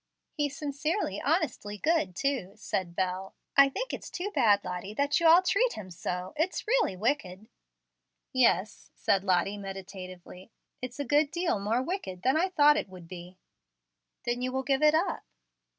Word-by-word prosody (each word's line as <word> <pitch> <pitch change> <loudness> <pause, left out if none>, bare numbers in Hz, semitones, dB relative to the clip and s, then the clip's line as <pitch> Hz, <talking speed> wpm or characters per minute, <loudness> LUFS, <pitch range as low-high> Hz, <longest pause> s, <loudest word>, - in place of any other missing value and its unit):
"He's 290 -2 -2
sincerely, 300 +6 -2
honestly 205 0 -1
good, 300 - +1
too," 260 -8 -1
said 185 -5 -3
Bel. 185 +1 -2 0.2
"I 275 0 +7
think - - -4
it's - - -6
too 385 +4 -4
bad, 205 - +4
Lottie, 180 +3 -5
that 285 +3 +2
you 335 - +4
all 340 +3 +7
treat 470 +7 +2
him 185 -3 -8
so. 180 +2 -4
It's 325 +5 -1
really 470 - +2
wicked." 210 -4 -1 0.9
"Yes," 220 -6 +2
said 195 -1 +1
Lottie, 190 +2 +1
meditatively. 190 -1 -9 0.3
"It's 250 +2 -6
a 285 - -1
good 290 +3 +3
deal 340 - 0
more 220 +5 0
wicked 260 - -5
than 260 +3 +3
I 355 +4 +2
thought 295 -4 +5
it 205 - -3
would 180 -2 -12
be." 180 +1 -10 0.9
"Then 240 +1 -1
you 255 0 -1
will 265 +1 -2
give 270 +1 +1
it 305 0 +5
up." 345 +4 0
240 Hz, 165 wpm, -29 LUFS, 185-300 Hz, 0.9 s, I